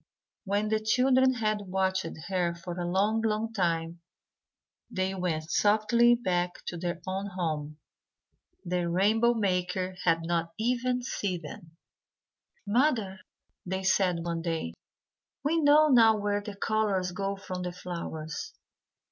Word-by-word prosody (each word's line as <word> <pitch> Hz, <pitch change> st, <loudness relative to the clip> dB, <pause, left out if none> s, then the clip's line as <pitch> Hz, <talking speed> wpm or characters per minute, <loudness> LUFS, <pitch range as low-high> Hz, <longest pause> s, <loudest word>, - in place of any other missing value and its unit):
When 205 Hz, +2 st, 0 dB
the 220 Hz, 0 st, +2 dB
children 255 Hz, +4 st, +3 dB
had 215 Hz, -3 st, -1 dB
watched 190 Hz, -1 st, 0 dB, 0.2 s
her 175 Hz, -3 st, 0 dB
for 175 Hz, +1 st, -7 dB
a 175 Hz, 0 st, -2 dB
long 205 Hz, +5 st, +2 dB
long 220 Hz, +1 st, -1 dB
time, 170 Hz, -3 st, -1 dB, 0.9 s
they 185 Hz, 0 st, -1 dB
went 170 Hz, -4 st, -2 dB
softly 220 Hz, +3 st, +4 dB
back 180 Hz, -6 st, -2 dB
to 175 Hz, -, -6 dB
their 175 Hz, 0 st, -3 dB
own 190 Hz, +2 st, -3 dB
home. 155 Hz, -5 st, -3 dB, 0.9 s
The 175 Hz, -1 st, -1 dB
rainbow 220 Hz, +7 st, +3 dB
maker 185 Hz, -2 st, -1 dB
had 165 Hz, -1 st, +2 dB
not 165 Hz, 0 st, -1 dB
even 250 Hz, +2 st, 0 dB
seen 185 Hz, -8 st, -3 dB
them. 160 Hz, +2 st, -11 dB, 0.9 s
"Mother," 220 Hz, -4 st, +1 dB, 0.4 s
they 190 Hz, +1 st, -3 dB
said 180 Hz, -3 st, +2 dB
one 170 Hz, -1 st, -2 dB
day, 165 Hz, -, -3 dB, 0.7 s
"we 325 Hz, +3 st, +2 dB
know 300 Hz, +1 st, +6 dB
now 225 Hz, -4 st, +6 dB
where 205 Hz, 0 st, -1 dB
the 205 Hz, 0 st, -7 dB
colours 200 Hz, -3 st, 0 dB
go 195 Hz, +2 st, -2 dB
from 185 Hz, -2 st, -6 dB
the 180 Hz, 0 st, -3 dB
flowers. 170 Hz, -3 st, -6 dB
190 Hz, 130 wpm, -29 LUFS, 175-220 Hz, 0.9 s, know